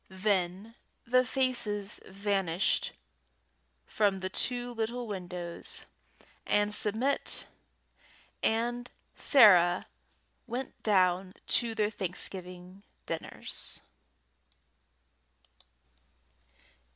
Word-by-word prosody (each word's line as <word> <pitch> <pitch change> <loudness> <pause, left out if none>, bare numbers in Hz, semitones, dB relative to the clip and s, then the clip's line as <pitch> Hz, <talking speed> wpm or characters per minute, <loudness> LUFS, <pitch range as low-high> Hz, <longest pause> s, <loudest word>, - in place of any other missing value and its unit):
Then 190 +1 -1 0.3
the 255 +2 +4
faces 240 -6 0
vanished 195 -3 0 0.9
from 200 -3 +1
the 185 0 -3
two 245 +2 -2
little 235 +2 -3
windows, 180 -4 -5 0.6
and 205 0 +1
Submit 225 +7 +1 1.0
and 240 +2 0 0.2
Sarah 185 - +6 0.6
went 250 +3 -5
down 185 -2 +2
to 230 -2 +1
their 210 -1 +1
Thanksgiving 180 -1 -6 0.2
dinners. - - -3
205 Hz, 65 wpm, -30 LUFS, 185-235 Hz, 1.0 s, Sarah